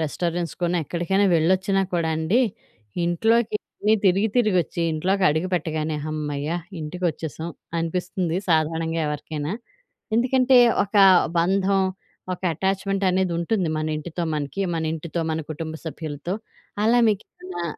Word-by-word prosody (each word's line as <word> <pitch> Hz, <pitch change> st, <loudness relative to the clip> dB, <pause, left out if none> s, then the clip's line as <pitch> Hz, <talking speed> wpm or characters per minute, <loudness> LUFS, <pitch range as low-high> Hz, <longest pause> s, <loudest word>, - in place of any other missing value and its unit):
రెస్టారెంట్స్‌కనో 175 Hz, +2 st, -1 dB
ఎక్కడికైనా 180 Hz, +6 st, +1 dB
వెళ్లొచ్చినా 190 Hz, +4 st, +2 dB
కూడా 170 Hz, -2 st, +1 dB
అండి, 160 Hz, +10 st, +2 dB, 0.6 s
ఇంట్లోకి 220 Hz, +6 st, +2 dB, 0.5 s
తిరిగి 195 Hz, +4 st, +3 dB
తిరిగొచ్చి 185 Hz, -, +2 dB
ఇంట్లోకి 190 Hz, +5 st, 0 dB
అడుగుపెట్టగానే 160 Hz, -1 st, -1 dB
హమ్మయ్య! 150 Hz, -1 st, -3 dB, 0.3 s
ఇంటికొచ్చేసాం 160 Hz, -1 st, -3 dB, 0.3 s
అనిపిస్తుంది, 175 Hz, +1 st, -2 dB
సాధారణంగా 165 Hz, 0 st, +1 dB
ఎవరికైనా. 150 Hz, +1 st, -3 dB, 0.6 s
ఎందుకంటే, 255 Hz, +1 st, +4 dB, 0.3 s
ఒక 200 Hz, +1 st, -17 dB, 0.4 s
బంధం, 195 Hz, +2 st, +2 dB, 0.5 s
ఒక -, -, -15 dB
అటాచ్‌మెంట్ 195 Hz, +2 st, -1 dB
అనేదుంటుంది 180 Hz, +1 st, 0 dB
మన 155 Hz, -, -2 dB
ఇంటితో 170 Hz, +2 st, -4 dB
మనకి. 145 Hz, +5 st, -2 dB
మన 165 Hz, -, -1 dB
ఇంటితో, 165 Hz, +1 st, -4 dB
మన 160 Hz, -, -1 dB
కుటుంబ 160 Hz, +1 st, -5 dB
సభ్యులతో. 160 Hz, +2 st, -4 dB, 0.5 s
అలా 240 Hz, +2 st, +5 dB
మీకేమన్నా 185 Hz, -3 st, -4 dB
175 Hz, 105 wpm, -23 LUFS, 160-195 Hz, 0.6 s, అలా